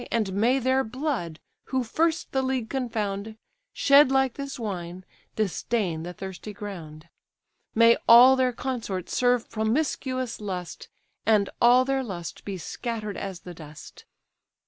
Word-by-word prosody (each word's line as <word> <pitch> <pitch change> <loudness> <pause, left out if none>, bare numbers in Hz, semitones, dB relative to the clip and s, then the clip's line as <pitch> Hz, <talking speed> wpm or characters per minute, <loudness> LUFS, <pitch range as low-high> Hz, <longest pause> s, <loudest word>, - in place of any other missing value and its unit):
And 215 -5 0
may 235 +7 +2
their 260 +1 +2
blood, 240 - -3 0.3
who 260 -1 -1
first 325 +8 0
the 265 - +1
league 260 -4 -2
confound, 220 -5 -3 0.3
Shed 280 -1 +5
like 265 -2 +2
this 275 -1 -6
wine, 185 -5 -5 0.3
disdain 195 -3 -1
the 175 +2 -6
thirsty 190 +3 -8
ground; 170 -6 -9 0.7
May 230 +1 +6
all 245 +3 +9
their 260 -1 +2
consorts 230 -8 -4
serve 245 -1 +2
promiscuous 255 +1 -1
lust, 185 -4 -6 0.3
And 210 -3 +2
all 245 +2 +6
their 270 0 0
lust 175 -7 -7
be 195 -2 -4
scatter'd 215 +2 -5
as 190 -2 -6
the 180 - -9
dust!" 155 -2 -12
225 Hz, 135 wpm, -26 LUFS, 190-260 Hz, 0.7 s, all